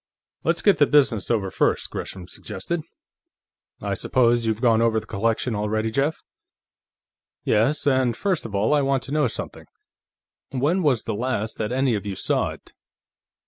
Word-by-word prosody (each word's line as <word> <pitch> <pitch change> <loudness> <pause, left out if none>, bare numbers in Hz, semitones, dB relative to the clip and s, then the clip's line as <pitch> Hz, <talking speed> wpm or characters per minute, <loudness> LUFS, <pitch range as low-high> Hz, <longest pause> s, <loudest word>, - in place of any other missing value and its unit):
"Let's - - 0
get 200 - +4
the 145 - +5
business 130 -9 +3
over 100 -5 0
first," - - 0
Gresham 90 -2 -6
suggested. 160 - -5 1.0
"I - - -1
suppose 120 -2 +2
you've 110 -1 0
gone 115 -2 +3
over 115 -1 +3
the - - -12
collection 115 +4 -1
already, 110 +1 -1
Jeff?" 140 +6 0 1.3
"Yes, 125 +8 +2
and 130 -4 +2
first 190 -5 0
of 110 -3 -6
all, 105 +8 +2
I 150 - +4
want 135 -1 +1
to 135 - -7
know 150 -3 +3
something. - - -6 0.8
When 145 +8 +1
was 140 -8 +2
the - - -3
last 110 -1 -2
that 110 +1 -2
any 130 -1 +1
of 105 -1 -3
you 100 - -3
saw - - 0
it?" - - -12
120 Hz, 165 wpm, -23 LUFS, 110-140 Hz, 1.3 s, the